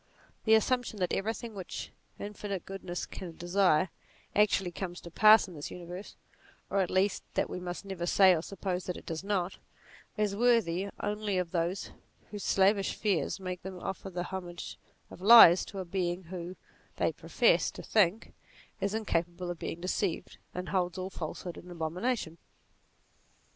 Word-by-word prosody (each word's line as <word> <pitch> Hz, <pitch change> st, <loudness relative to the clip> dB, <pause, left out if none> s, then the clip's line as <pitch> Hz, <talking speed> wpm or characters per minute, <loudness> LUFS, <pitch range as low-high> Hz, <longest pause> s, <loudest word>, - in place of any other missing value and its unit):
The 220 Hz, -, +5 dB
assump 245 Hz, +3 st, +3 dB
tion 215 Hz, -, -7 dB
that 180 Hz, -2 st, -1 dB
everything 225 Hz, +2 st, -2 dB
which 190 Hz, -3 st, -6 dB, 0.3 s
infinite 205 Hz, -2 st, -5 dB
goodness 185 Hz, -2 st, -5 dB
can 170 Hz, -3 st, -8 dB
desire, 180 Hz, -1 st, +3 dB, 0.5 s
actually 200 Hz, -3 st, +3 dB
comes 175 Hz, 0 st, -5 dB
to 170 Hz, -, -10 dB
pass 215 Hz, +3 st, +7 dB
in 180 Hz, -, -10 dB
this 150 Hz, -2 st, -6 dB
universe, 180 Hz, +2 st, -8 dB, 0.6 s
or 200 Hz, -, +2 dB
at 185 Hz, -, +1 dB
least 190 Hz, +1 st, +2 dB
that -, -, 0 dB
we -, -, -4 dB
must 180 Hz, +2 st, -6 dB
never 185 Hz, -3 st, -4 dB
say 190 Hz, 0 st, +6 dB
or 160 Hz, -, -1 dB
suppose 185 Hz, 0 st, -4 dB
that 180 Hz, -, -3 dB
it -, -, -12 dB
does 165 Hz, +1 st, -4 dB
not, 195 Hz, -3 st, -1 dB, 0.6 s
is 210 Hz, -2 st, +1 dB
worthy 200 Hz, -5 st, +2 dB
only 210 Hz, -1 st, -1 dB
of 180 Hz, -2 st, -1 dB
those 175 Hz, +2 st, -1 dB, 0.4 s
whose 205 Hz, -2 st, -6 dB
slavish 195 Hz, 0 st, +3 dB
fears 195 Hz, -6 st, 0 dB
make 185 Hz, -1 st, -5 dB
them 190 Hz, 0 st, -7 dB
offer 195 Hz, +1 st, -5 dB
the 175 Hz, -1 st, -3 dB
homage 175 Hz, -2 st, -6 dB, 0.3 s
of -, -, -11 dB
lies 195 Hz, -4 st, +9 dB
to 200 Hz, -, -9 dB
a 190 Hz, -, -3 dB
Being 175 Hz, 0 st, -2 dB
who, 175 Hz, +1 st, -7 dB, 0.4 s
they -, -, +2 dB
profess -, -, +2 dB
to -, -, -9 dB
think, 210 Hz, 0 st, +2 dB, 0.5 s
is 200 Hz, +2 st, -1 dB
incapable 175 Hz, -4 st, -1 dB
of 175 Hz, -, -7 dB
being 170 Hz, -, -5 dB
deceived 185 Hz, -1 st, -2 dB, 0.2 s
and 180 Hz, 0 st, -4 dB
holds 180 Hz, -1 st, 0 dB
all 185 Hz, +1 st, -4 dB
falsehood 175 Hz, +1 st, -6 dB
in 180 Hz, -, -13 dB
abomination. 175 Hz, +2 st, -2 dB
185 Hz, 165 wpm, -30 LUFS, 175-200 Hz, 0.6 s, lies